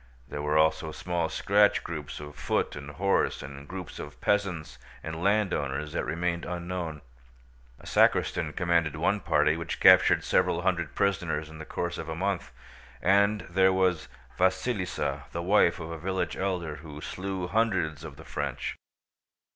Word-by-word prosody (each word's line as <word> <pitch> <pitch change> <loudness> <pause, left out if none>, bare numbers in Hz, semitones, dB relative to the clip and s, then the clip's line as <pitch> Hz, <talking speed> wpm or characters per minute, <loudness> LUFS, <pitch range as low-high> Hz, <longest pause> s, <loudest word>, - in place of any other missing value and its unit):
There 75 - -5
were 75 +1 +1
also 80 0 +2
small 85 -1 -2
scratch 105 +1 +3
groups 75 -4 -6
of 75 -1 -9
foot - - -1
and 75 -1 -7
horse, 95 +7 0
and 70 +1 -9
groups 90 -1 -7
of - - -8
peasants 85 -9 -1 0.2
and 80 +1 -5
landowners 75 -8 0
that - - -1
remained 85 +1 -1
unknown. 85 -3 -4 0.8
A - - -15
sacristan - - +2
commanded 85 -3 +1
one - - +1
party 75 +1 +2
which 85 -1 -4
captured - - +7
several - - +2
hundred - - 0
prisoners 80 -6 0
in 80 - -11
the 80 - -7
course 85 0 -3
of 80 - -6
a 80 - -3
month; 90 -6 -2 0.5
and 100 +4 +3
there 95 +2 +4
was 95 -4 +1 0.3
Vasílisa, 95 - 0
the 85 - -3
wife 90 -2 +4
of 80 0 -6
a 80 - -6
village 95 +2 -2
elder, 90 -5 -2
who 75 -1 -10
slew 95 +3 -4
hundreds 95 -7 0
of - - -8
the - - -13
French. - - -3
85 Hz, 155 wpm, -28 LUFS, 75-95 Hz, 0.8 s, captured